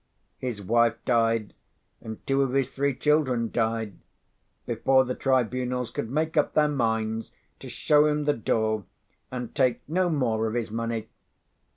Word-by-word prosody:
His 120 -6 -4
wife 115 +3 +3
died, 115 -3 +1 0.5
and 110 -1 -9
two 135 0 +2
of 135 -2 0
his 135 -1 +1
three 140 -1 0
children 130 -5 +1
died, 110 -3 -1 0.7
before 130 +3 +3
the 125 - -2
tribunals 125 -1 0
could 110 - -4
make 155 +5 -1
up 150 - +1
their 150 -1 +4
minds 110 -5 -1 0.3
to - - -9
show 150 0 +3
him 150 0 0
the 145 - +3
door 110 -3 0 0.4
and 125 -2 -6
take 130 -4 +1
no 180 +4 +1
more 115 -8 0
of 110 - -3
his 115 -3 -2
money. 115 -1 -3
125 Hz, 155 wpm, -26 LUFS, 115-135 Hz, 0.7 s, their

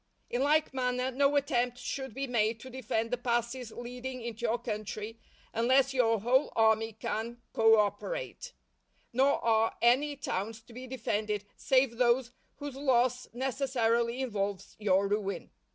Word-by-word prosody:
In 245 - 0
like 300 +1 +3
manner, 250 0 0
no 280 +2 +2
attempt 250 -4 +1
should 265 -1 -5
be 275 - -2
made 225 -3 +1
to 260 - -10
defend 230 -2 -2
the 245 - -1
passes 240 0 -1
leading 250 +2 -6
into 235 0 -4
your 230 +2 +1
country 215 0 -5 0.3
unless 260 +4 +3
your 230 -5 +2
whole 255 +5 +3
army 225 0 +3
can 225 +2 -4
co 225 0 +6
operate; - - -2 0.6
nor 270 +3 +4
are 225 -1 +2
any 270 +5 +3
towns 220 -4 -4
to 230 - -16
be 255 +2 -8
defended 210 -4 -2
save 260 -4 +2
those 245 0 +3 0.2
whose 285 -2 -7
loss 255 -2 +2
necessarily 245 -2 0
involves 200 -5 -3
your 200 -1 +3
ruin. 200 -3 -2
240 Hz, 145 wpm, -30 LUFS, 225-260 Hz, 0.6 s, co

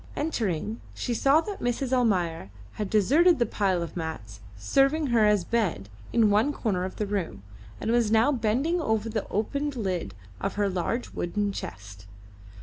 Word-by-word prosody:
Entering, 220 - -2
she 245 - -2
saw 275 +7 +4
that 405 +3 -6
Mrs. 245 +2 -1
Almayer 180 - +1 0.2
had 210 -2 -4
deserted 300 - +4
the 240 - +2
pile 190 -5 0
of 170 - -8
mats 155 - -6 0.2
serving 275 - +2
her 220 -2 +5
as 210 -3 +3
bed 175 - -1 0.2
in 220 -3 +4
one 215 +8 +3
corner 195 -10 -1
of 185 - -6
the 210 - -2
room, 185 - -3 0.4
and 225 - -1
was 235 -2 +3
now 225 +6 +4
bending 270 +8 0
over 220 -5 0
the 215 -2 -3
opened 280 +7 -2
lid 180 - -3 0.2
of - - -3
her 205 -1 +1
large 190 +7 -2
wooden 205 +4 -1
chest. 95 - -8
215 Hz, 165 wpm, -27 LUFS, 180-245 Hz, 0.4 s, her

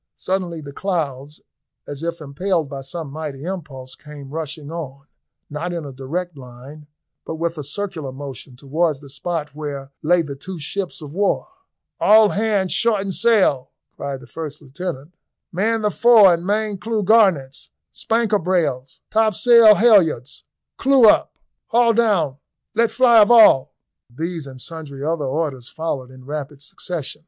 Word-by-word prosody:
Suddenly 180 -4 -3
the 140 -1 -9
clouds, 150 -6 -4 0.5
as 145 0 -7
if 170 0 -4
impelled 160 +3 -1
by 140 -1 -7
some 145 +2 -7
mighty 150 -2 -6
impulse, 150 -8 -7
came 145 -2 -12
rushing 155 -1 -6
on, 140 -5 -7 0.4
not 160 +4 -4
in 170 -3 -4
a 140 - -8
direct 160 +7 -5
line, 135 +3 -12 0.4
but 160 - -6
with 165 +1 -2
a 150 - -6
circular 160 -2 -5
motion, 135 -2 -9
towards 150 +3 -1
the 140 -1 -14
spot 150 +1 -4
where 140 -2 -6
lay 170 +2 +3
the 140 -3 -7
two 185 +7 -8
ships 175 +2 -5
of 145 -1 -9
war. 200 +2 0 0.5
"All 215 0 +6
hands 205 -3 0
shorten 200 -1 +1
sail," 190 - +2 0.2
cried 135 -2 -5
the - - -12
first 155 -3 -7
lieutenant. 150 +2 -7 0.4
"Man 220 +5 0
the 210 - +1
fore 220 -6 +6
and 170 +2 -3
main 210 -1 -1
clew 220 0 -2
garnets, 185 -11 +2 0.2
spanker 225 -2 0
brails 155 -8 -1
topsail 220 +1 +6
halyards 185 - +3 0.3
clew 265 -4 +5
up - - +3 0.3
haul 235 0 +3
down, 200 - +1 0.4
let 230 +1 +2
fly 240 -3 +5
of 210 - +6
all." 220 - +6 0.3
These 160 +4 -5
and 130 -1 -11
sundry 140 -2 -8
other 160 -2 -1
orders 135 -3 -3
followed 145 -6 -4
in 130 -1 -15
rapid 145 0 -6
succession. 150 0 -6
160 Hz, 150 wpm, -20 LUFS, 140-195 Hz, 0.5 s, All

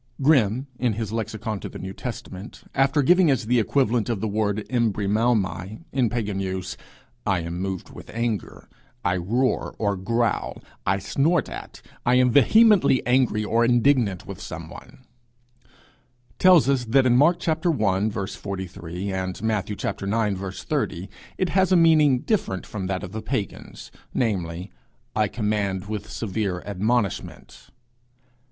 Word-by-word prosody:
Grimm, 130 -4 +3
in 120 -3 +1
his 110 -1 -4
lexicon 110 -1 -3
to - - -6
the - - -9
New 95 +1 -6
Testament, 105 -3 -8
after 135 +2 +3
giving 175 +3 +5
as 130 -5 +1
the 120 +2 +3
equivalent 120 -1 +1
of 115 -4 -1
the 110 - -1
word 105 -1 0
[Greek: 110 - -6
embrimaomai] 110 - 0
in 125 -4 +1
pagan 105 -4 -2
use, 95 -1 -3 0.5
'I 95 -4 +2
am 85 +1 -5
moved 95 -1 -4
with - - -12
anger,' 115 -2 -3 0.4
'I 90 +1 +2
roar 120 +9 0
or 100 -2 0
growl,' 115 +5 -1 0.3
'I 95 +1 +3
snort 140 - +1
at,' - - -9 0.2
'I 125 - +3
am 125 -1 +4
vehemently 190 - +5
angry 125 -4 +2
or 115 +3 +2
indignant 120 - +2
with - - -8
some - - -7
one,' 130 - -13 1.3
tells 180 -6 +6
us 135 -2 +2
that 130 +4 +3
in 120 -1 +4
Mark 160 +8 +3
i. 160 - +4 0.7
43, 95 -1 -6
and 95 +1 -4
Matthew 105 -2 -1
ix. 100 -2 -2
30, 90 +4 -2 0.3
it 185 - 0
has 190 +1 +2
a - - +6
meaning 155 -6 +5
different 140 - -1
from 95 -3 -5
that 95 -1 -2
of 90 - -6
the 110 +1 -5
pagans, 110 -3 -5 0.2
namely, 90 -5 -1 0.4
'I 110 -1 +2
command 100 -3 -1
with 105 0 -5
severe 100 -4 -3
admonishment.' 105 +2 -2
110 Hz, 145 wpm, -24 LUFS, 95-125 Hz, 1.3 s, tells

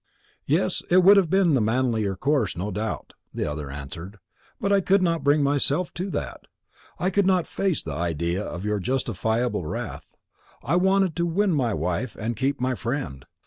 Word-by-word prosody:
"Yes, - - +1
it 180 +1 +5
would 200 +3 +8
have 185 -5 +3
been 190 -3 +3
the 130 - +3
manlier 110 -3 +1
course, 130 - 0
no 100 +4 -3
doubt," 105 +3 -4 0.2
the - - -3
other 75 -1 -4
answered; 80 +8 -8 0.4
"but 200 - 0
I 200 - +4
could 195 +1 +3
not 165 -2 0
bring 145 +1 +3
myself 145 +4 +1
to 185 +3 -4
that. - - -5 0.5
I 185 +3 0
could 200 0 +2
not 185 -3 +3
face 190 -6 -1
the 75 - -5
idea 85 +4 -1
of 90 +1 -6
your 105 -1 0
justifiable 115 -3 -1
wrath. - - -6 0.5
I - - +1
wanted 190 -1 +3
to 170 0 +1
win 190 +3 +1
my 120 -8 +1
wife 90 +8 -2
and 115 +2 -3
keep 135 +5 -1
my 130 +1 0
friend. 115 - -4
130 Hz, 185 wpm, -25 LUFS, -, 0.5 s, would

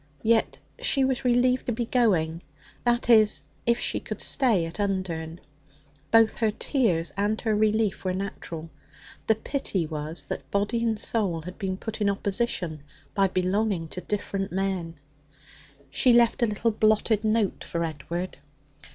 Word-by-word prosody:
Yet 225 0 +2 0.2
she 270 -2 +2
was 260 -1 -1
relieved 250 +1 +2
to - - +1
be 235 +1 -2
going 175 -10 +1 0.4
that 240 0 +2
is, 220 -3 +5 0.2
if 235 0 +3
she - - -1
could - - -6
stay 225 -11 +2
at 165 +5 -8
Undern. 175 -5 -2 0.7
Both 225 -1 +4
her 225 -2 +2
tears 205 - 0
and 205 +2 0
her 220 -2 +1
relief 215 -1 +1
were 185 -1 -1
natural. 165 -4 -6 0.6
The 220 - +4
pity 215 - -2
was 155 +1 -4
that - - -6
body 205 +4 0
and 225 -2 +1
soul 190 -9 -1
had 180 +4 -9
been 190 -2 -2
put 220 +2 -6
in 205 - +3
opposition 195 -6 -1 0.3
by 195 -1 +3
belonging 185 -1 0
to 180 - -6
different 195 -1 -3
men. 185 -3 -2 1.0
She 250 - +4
left 235 0 +4
a 235 - +4
little 220 +2 0
blotted 215 0 +2
note 215 -2 +1
for 170 0 -2
Edward. 165 +3 -4
205 Hz, 150 wpm, -26 LUFS, 180-225 Hz, 1.0 s, is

